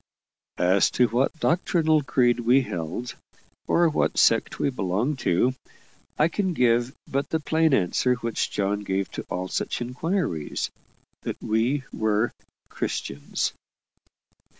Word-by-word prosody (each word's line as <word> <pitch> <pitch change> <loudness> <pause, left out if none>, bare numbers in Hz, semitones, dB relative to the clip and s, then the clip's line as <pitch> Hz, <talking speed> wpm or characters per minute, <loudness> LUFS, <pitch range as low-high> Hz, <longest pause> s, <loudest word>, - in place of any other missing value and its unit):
As 95 +2 +4
to 125 - +5
what 125 +5 +2
doctrinal 160 -2 +2
creed 125 -3 +2
we 120 +3 +4
held, 85 +5 -5 0.5
or 170 0 +4
what 155 - 0
sect - - +3
we 140 - 0
belonged 115 +6 -1
to, 120 +9 +2 0.6
I 155 - +4
can 185 +1 -1
give 120 0 +2
but 140 +1 -2
the 160 - 0
plain 160 +1 +2
answer 125 +3 +2
which 115 -2 -2
John 100 0 -1
gave 95 -1 -2
to - - -6
all 90 +1 -3
such - - -2
inquiries 125 - -2 0.5
that - - -5
we 120 +6 0
were 110 +1 +1 0.4
CHRISTIANS. 70 +1 -3
120 Hz, 125 wpm, -25 LUFS, 100-145 Hz, 0.6 s, to